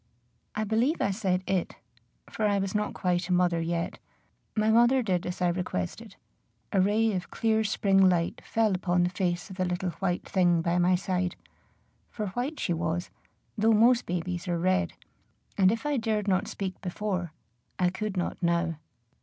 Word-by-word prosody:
I 215 - 0
believe 225 +9 +1
I 200 - +1
said 185 -2 0
it, 190 -2 -1 0.5
for 215 - -1
I 205 -1 +2
was 195 -1 -2
not 210 0 -1
quite 180 0 0
a - - +2
mother 175 -2 +2
yet. 170 0 -2 0.6
My 215 0 +3
mother 240 +3 +5
did 180 -5 -1
as 180 +1 -3
I 175 - +3
requested; 180 - -4 0.6
a 195 - +3
ray 215 +3 +2
of 180 -3 -3
clear 220 -1 +1
spring 195 -2 +3
light 170 -2 0
fell 225 -3 +1
upon 180 -1 +1
the 175 - 0
face 180 -1 -2
of 190 - -9
the 185 - +1
little 180 0 -2
white 180 -2 -1
thing 175 -3 +2
by 175 +1 +1
my 180 +1 +4
side, 180 0 -1 0.7
for 210 -3 -4
white 250 +9 -3
she 175 - 0
was, 170 +1 -2 0.4
though 225 +1 +3
most 235 +3 +4
babies 175 +1 -3
are 175 -1 0
red, 185 +2 +1 0.6
and 190 -1 +5
if 225 +3 -3
I 295 -1 +1
dared 220 -3 -1
not 190 +2 +1
speak 190 -3 -5
before, 180 -2 -3 0.5
I 180 -1 +2
could 210 0 -4
not 175 - -2
now. 170 -1 +1
185 Hz, 180 wpm, -28 LUFS, 175-215 Hz, 0.7 s, mother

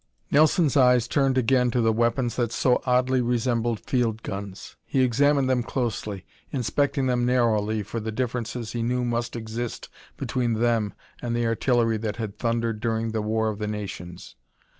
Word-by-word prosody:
Nelson's 155 0 +4
eyes 125 -3 +5
turned 135 0 +2
again 125 0 +3
to 120 - 0
the 115 -1 +3
weapons 120 +1 +1
that 120 -2 0
so 125 +1 +2
oddly 125 +1 +3
resembled 120 -1 0
field 115 -4 -1
guns. 100 -1 -7
He 135 -2 +1
examined 140 +2 +3
them 130 -1 +2
closely, 110 -6 -3 0.3
inspecting 140 +2 0
them 125 -1 +1
narrowly 110 -4 +1
for 115 - -5
the 110 0 -4
differences 120 -1 -3
he 120 - -3
knew 125 +1 0
must 120 0 -2
exist 115 +1 -5 0.3
between 120 -2 -1
them 115 -2 +1 0.3
and 120 -1 -2
the 120 0 0
artillery 115 0 +2
that 105 -1 -3
had 110 -3 -6
thundered 115 -2 -1
during 115 0 -1
the 110 -1 -1
War 110 +1 0
of 105 -1 -5
the 105 - -2
Nations. 95 -4 -7
120 Hz, 165 wpm, -25 LUFS, 110-125 Hz, 0.3 s, eyes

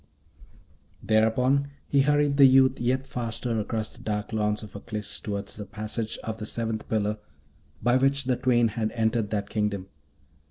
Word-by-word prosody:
Thereupon 125 +6 +2 0.2
he 140 - +3
hurried 145 0 +2
the 140 - +9
youth 130 0 +5
yet 130 +2 +1
faster 115 -2 -3
across 110 0 -3
the - - -14
dark 105 0 -3
lawns 105 0 0
of 105 - -10
Aklis 105 0 -6
toward 100 -1 -4
the 105 - -7
passage 110 +2 -4
of 110 0 -4
the 105 - -5
Seventh 115 -1 -3
Pillar, 105 -1 0 0.6
by 120 +1 +4
which 135 +2 +2
the 130 -1 +1
twain 120 -2 +3
had 110 0 -1
entered 110 -1 0
that 100 -1 -3
kingdom. 100 -3 -1
110 Hz, 160 wpm, -26 LUFS, 105-130 Hz, 0.6 s, the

